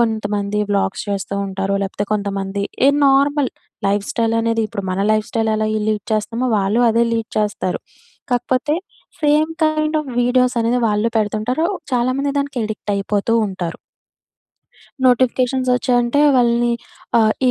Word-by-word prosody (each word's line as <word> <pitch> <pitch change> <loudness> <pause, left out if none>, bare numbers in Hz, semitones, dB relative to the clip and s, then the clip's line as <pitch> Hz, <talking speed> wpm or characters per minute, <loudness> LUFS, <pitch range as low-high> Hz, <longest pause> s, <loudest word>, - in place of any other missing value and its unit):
కొంతమంది 210 -2 0
వ్లాగ్స్ 200 -1 0
చేస్తూ 200 0 -3
ఉంటారు. 195 +1 -2
లేకపోతే 195 +1 -3
కొంతమంది 200 -1 -3 0.2
ఏ - - +7 0.2
నార్మల్ 280 0 +3 0.4
లైఫ్ 200 0 0
స్టైల్ 230 -1 +1
అనేది 230 0 +1
ఇప్పుడు 200 -1 -5
మన 185 - -2
లైఫ్ 215 0 0
స్టైల్ 225 -1 0
ఎలా 215 0 0 0.2
లీడ్ 210 -2 -1
చేస్తామో, 230 +4 -1
వాళ్ళు 200 +5 +1
అదే 230 +1 +3
లీడ్ 225 -1 -3
చేస్తారు. 210 -3 -1 0.5
కాకపోతే 255 +4 0 0.5
సేమ్ 300 +1 +3
కైండ్ 310 0 +1
ఆఫ్ 290 -3 -8
వీడియోస్ 250 0 +2
అనేది 240 +2 +1
వాళ్ళు 210 +2 +1
పెడుతుంటారు. 220 +8 0 0.3
చాలామంది 255 +3 +1
దానికి 280 -2 -2
అడిక్ట్ 215 -1 -5
అయిపోతూ 200 +2 -1
ఉంటారు. 185 -4 -5 1.3
నోటిఫికేషన్స్ 255 +1 +2
వచ్చాయంటే 245 +2 +1 0.2
వాళ్ళని 240 -1 +3 0.5
ఆహ్, 215 -1 +4 0.2
ఈ - - +5
230 Hz, 135 wpm, -19 LUFS, 205-255 Hz, 1.3 s, ఏ